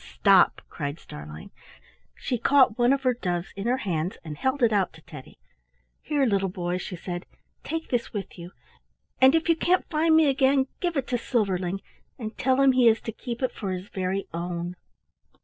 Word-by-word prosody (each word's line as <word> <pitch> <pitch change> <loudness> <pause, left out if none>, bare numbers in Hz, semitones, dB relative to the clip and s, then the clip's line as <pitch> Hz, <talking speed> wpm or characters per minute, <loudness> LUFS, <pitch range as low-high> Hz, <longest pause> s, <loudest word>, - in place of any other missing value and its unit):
oh, - - -14
stop!" - - +5
cried 145 +2 -5
Starlein. 75 - -10 0.6
She 245 - -3
caught 260 -2 +4
one 240 +1 +3
of 275 0 +1
her 255 -1 +3
doves 180 -6 -3
in 195 +3 -4
her 250 +2 +2
hands 180 -6 -2
and 155 -3 -6
held 260 - -1
it 225 -2 +4
out 195 -3 +1
to 165 - -15
Teddy. 150 -5 -12 0.6
"Here, 290 -3 +1
little 195 -4 +1
boy," 180 0 -3
she 180 - -6
said; 175 +1 -6 0.4
"take 325 0 -4
this 240 -2 -1
with 205 -2 -6
you, 175 -1 -9 0.7
and 265 +3 +7
if 325 +1 +1
you 335 - +4
can't 355 +3 +1
find 320 0 +3
me 320 -1 +6
again, 270 0 +3
give 345 -4 -1
it 270 - 0
to 245 - 0
Silverling 195 -6 -1 0.4
and 220 -4 -6
tell 260 +1 +1
him 275 -1 +6
he 255 -2 +4
is 225 0 +5
to 225 - -5
keep 235 +3 -6
it 255 - +1
for 195 -3 -4
his 185 +2 -6
very 190 +1 -2
own." 175 +1 -4
220 Hz, 200 wpm, -26 LUFS, 180-265 Hz, 0.7 s, and